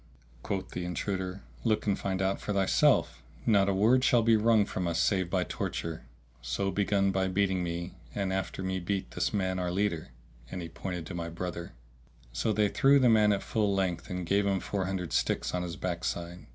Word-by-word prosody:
Quoth 95 Hz, +6 st, -3 dB
the 90 Hz, -, -4 dB
intruder, 95 Hz, +2 st, -3 dB, 0.2 s
"Look 110 Hz, -, +1 dB
and 100 Hz, -2 st, +2 dB
find 95 Hz, -1 st, -1 dB
out 95 Hz, +1 st, 0 dB
for 105 Hz, -, -2 dB
thyself, 95 Hz, -1 st, +3 dB, 0.2 s
not 100 Hz, -3 st, +4 dB
a -, -, +2 dB
word 115 Hz, +6 st, +4 dB
shall 120 Hz, -3 st, +4 dB
be 115 Hz, 0 st, +5 dB
wrung 110 Hz, -1 st, +4 dB
from 90 Hz, -3 st, -3 dB
us 85 Hz, -1 st, 0 dB
save 95 Hz, 0 st, +2 dB
by 90 Hz, 0 st, +1 dB
torture, 80 Hz, -2 st, -4 dB, 0.3 s
so 65 Hz, +11 st, -1 dB
begin 100 Hz, 0 st, +2 dB
by 95 Hz, 0 st, +1 dB
beating 95 Hz, -1 st, +1 dB
me 85 Hz, +1 st, -4 dB, 0.2 s
and 95 Hz, -2 st, -1 dB
after 95 Hz, 0 st, -3 dB
me 95 Hz, 0 st, -1 dB
beat 95 Hz, +2 st, -3 dB
this -, -, -1 dB
man 95 Hz, -3 st, -1 dB
our 90 Hz, -1 st, -1 dB
leader."[FN#654] -, -, -4 dB
And 90 Hz, -, -4 dB
he 85 Hz, -, -6 dB
pointed 90 Hz, 0 st, -5 dB
to 95 Hz, -, -7 dB
my 85 Hz, -1 st, -4 dB
brother. 85 Hz, 0 st, -5 dB, 0.6 s
So -, -, 0 dB
they 105 Hz, 0 st, +3 dB
threw 140 Hz, +6 st, +5 dB
the 130 Hz, -3 st, +5 dB
man 105 Hz, -2 st, +5 dB
at 100 Hz, -, 0 dB
full 105 Hz, -3 st, 0 dB
length 90 Hz, -3 st, -1 dB
and 90 Hz, -1 st, -3 dB
gave 100 Hz, +3 st, +2 dB
him 95 Hz, -1 st, +1 dB
four 100 Hz, -1 st, -2 dB
hundred 90 Hz, -4 st, -3 dB
sticks -, -, 0 dB
on 90 Hz, -, 0 dB
his 85 Hz, -1 st, -4 dB
backside. 85 Hz, 0 st, -4 dB
95 Hz, 205 wpm, -30 LUFS, 85-100 Hz, 0.6 s, be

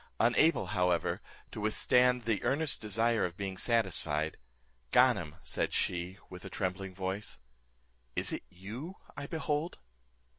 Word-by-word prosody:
Unable, 120 Hz, +8 st, +4 dB
however, 90 Hz, -2 st, +1 dB, 0.3 s
to -, -, -6 dB
withstand 125 Hz, +3 st, +4 dB
the 110 Hz, -3 st, 0 dB
earnest 145 Hz, +2 st, +1 dB
desire 115 Hz, +2 st, +2 dB
of 90 Hz, 0 st, -2 dB
being 95 Hz, -1 st, -3 dB
satisfied, 90 Hz, -9 st, +1 dB, 0.5 s
"Ganem," 75 Hz, +3 st, +4 dB
said -, -, -1 dB
she, 90 Hz, +2 st, -1 dB
with 90 Hz, -1 st, -10 dB
a 95 Hz, -, -7 dB
trembling 95 Hz, 0 st, -3 dB
voice, 95 Hz, -1 st, -3 dB, 0.8 s
"is -, -, +1 dB
it -, -, -3 dB
you 110 Hz, -, -7 dB, 0.2 s
I 140 Hz, 0 st, -5 dB
behold?" 155 Hz, +1 st, -2 dB
100 Hz, 125 wpm, -32 LUFS, 90-125 Hz, 0.8 s, Unable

